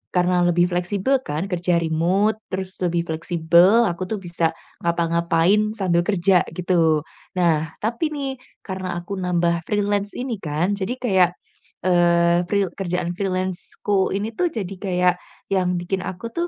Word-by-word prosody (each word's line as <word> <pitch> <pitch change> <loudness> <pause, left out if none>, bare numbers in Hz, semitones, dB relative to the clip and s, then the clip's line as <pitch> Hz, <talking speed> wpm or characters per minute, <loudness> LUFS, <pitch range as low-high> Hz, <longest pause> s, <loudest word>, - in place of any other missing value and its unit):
karena 180 0 +3
lebih 175 +1 +2
fleksibel 195 +9 +1
kan 160 +7 -3
kerja 180 0 +1
remote 185 +7 +1
terus 190 0 -5
lebih 175 -2 0
fleksibel 170 +6 +3
aku 180 +2 -5
tuh 220 - -2
bisa 170 -2 -1 0.2
ngapa-ngapain 170 +5 +1
sambil 185 -5 +1
kerja 185 -2 +3
gitu. 165 -3 +2 0.3
Nah, 160 -3 +1
tapi 235 +8 0
nih, 270 -2 -4 0.2
karena 185 -3 -4
aku 175 +3 -5
nambah 175 -1 0
freelance 205 -1 0
ini 245 -4 -3
kan, 160 +3 -1
jadi 200 +4 -2
kayak, 190 -9 +3 0.5
eee, 175 -1 +3
fri 200 +1 +2 0.2
kerjaan 180 -2 -1
freelance-ku 190 +1 -1
ini 205 +2 -2
tuh 355 +10 0
jadi 195 -4 -4
kayak, 180 -2 +2 0.4
yang 185 -2 +2
bikin 175 +2 -2
aku 225 +5 -6
tuh, 340 +5 -2
180 Hz, 140 wpm, -22 LUFS, 170-200 Hz, 0.5 s, karena